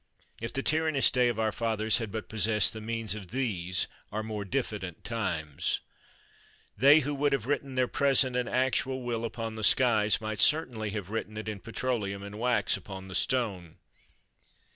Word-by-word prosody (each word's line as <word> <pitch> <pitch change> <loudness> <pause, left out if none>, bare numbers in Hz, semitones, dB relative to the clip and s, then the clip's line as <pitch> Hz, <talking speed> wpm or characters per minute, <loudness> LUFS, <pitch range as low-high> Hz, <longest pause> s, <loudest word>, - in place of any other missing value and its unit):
If 115 - -2
the 135 - -2
tyrannous 155 -3 +3
day 125 -1 +3
of 120 -2 -1
our 110 -1 +1
fathers 110 0 +1
had 115 -3 -4
but 110 0 -5
possessed 105 -1 +2
the 110 - -7
means 115 -2 -2
of 105 -3 -7
these 95 -9 -1 0.3
our 110 +1 -2
more 110 -2 -4
diffident 100 - -3
times! 85 -10 -2 1.0
They, 145 +3 +7
who 145 +1 -2
would 145 0 +1
have 130 -5 0
written 140 -1 -2
their 130 -1 +2
present 135 -2 +2
and 125 -1 0
actual 130 0 0
will 120 -2 -2
upon 115 -1 -4
the 110 - -4
skies, 110 -2 +4
might 110 -1 -4
certainly 120 -9 +3
have 105 -2 -5
written 110 -1 -4
it 110 - -5
in 105 -2 -4
petroleum 110 -3 -2
and 100 +1 -8
wax 125 +1 +2
upon 95 -1 -8
the - - -7
stone. 100 -9 -1
110 Hz, 175 wpm, -29 LUFS, 105-130 Hz, 1.0 s, They